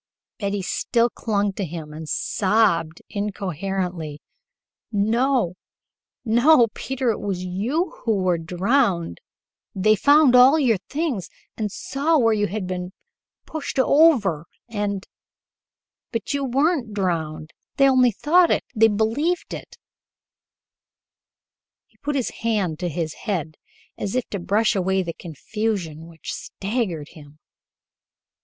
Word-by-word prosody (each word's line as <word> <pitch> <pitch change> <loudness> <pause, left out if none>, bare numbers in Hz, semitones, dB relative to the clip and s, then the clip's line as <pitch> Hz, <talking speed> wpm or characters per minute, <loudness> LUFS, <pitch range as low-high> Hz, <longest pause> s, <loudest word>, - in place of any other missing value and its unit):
Betty 200 -2 -2
still 235 +5 +1
clung 205 -3 -1
to 200 - -3
him 160 -3 -6
and 155 0 -8
sobbed 170 -6 +1
incoherently. 185 -5 -3 0.7
"No, 230 0 +1 0.7
no, 240 +2 +5
Peter, 265 -2 -1
it 215 - -4
was 190 -3 -3
you 245 - -1
who 225 -3 +2
were 180 -3 +1
drowned 180 - 0 0.5
they 215 +3 +4
found 285 +3 +5
all 255 +5 +7
your 240 -9 +2
things 280 - -2 0.3
and 210 -2 -3
saw 290 +9 0
where 225 -5 +4
you 205 -1 +1
had 205 +1 -4
been 180 0 -5 0.5
pushed 310 -3 -5
over, 260 - +4 0.2
and 205 -3 -3 1.1
but 230 +3 -3
you 280 -1 -1
weren't 270 -3 0
drowned! 160 -5 -2 0.3
They 275 - +6
only 255 -2 +5
thought 335 - +3
it - - +1
they 225 +1 +5
believed 225 +12 0
it - - -9 0.6
" - - -70
He - - -33
put 295 0 -3
his 260 -4 -1
hand 205 -8 0
to 180 -1 -2
his 160 0 -3 0.2
head 160 -6 -2 0.4
as 200 +3 -3
if 255 - -1
to 200 - -3
brush 210 +5 +1
away 190 0 +1
the 170 -1 -5
confusion 170 -1 -4
which 165 -1 -8
staggered 195 - -3
him. 150 -1 -15
205 Hz, 125 wpm, -23 LUFS, 180-250 Hz, 1.1 s, all